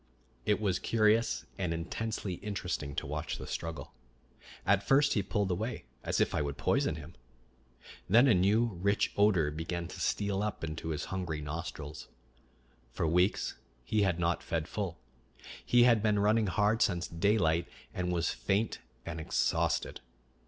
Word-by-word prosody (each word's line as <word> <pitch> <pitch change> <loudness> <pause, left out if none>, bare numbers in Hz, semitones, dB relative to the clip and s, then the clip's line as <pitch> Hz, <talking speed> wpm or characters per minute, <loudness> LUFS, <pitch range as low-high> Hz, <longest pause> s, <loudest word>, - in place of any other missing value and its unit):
It 105 -1 +3
was 95 -4 0
curious 115 +2 +2
and 90 -3 -1
intensely 100 +4 -3
interesting 90 -8 -3
to - - -2
watch 75 +3 -3
the - - -7
struggle. 80 -2 -5 0.7
At 100 0 +4
first 140 +7 +4
he 105 - +2
pulled 100 -1 -1
away, 110 +8 -3 0.2
as - - 0
if - - +2
I - - +1
would 70 -1 -3
poison - - +1
him. 80 +2 -9 1.0
Then 120 +7 +6
a 120 - +6
new 100 +6 +4 0.2
rich 100 +1 +2
odor 95 -8 +3
began 85 +2 -4
to - - -9
steal 100 -1 0
up 105 -4 -3
into 80 0 -4
his 75 -2 -2
hungry 90 -5 -2
nostrils. 75 0 -6 0.8
For 75 - -1
weeks 90 +4 +1 0.2
he 105 +11 +1
had 95 -4 +2
not 85 0 +1
fed 80 -1 -2
full; 95 -5 -3 0.7
he 120 0 +5
had 120 -3 +5
been 105 -1 +2
running 105 +1 +3
hard 105 +5 +2
since 90 -5 +2
daylight, 85 -2 +2 0.3
and 90 -1 -2
was 85 -1 +1
faint 105 +3 -1 0.3
and 85 -1 -5
exhausted. 80 - 0
95 Hz, 155 wpm, -31 LUFS, 80-105 Hz, 1.0 s, Then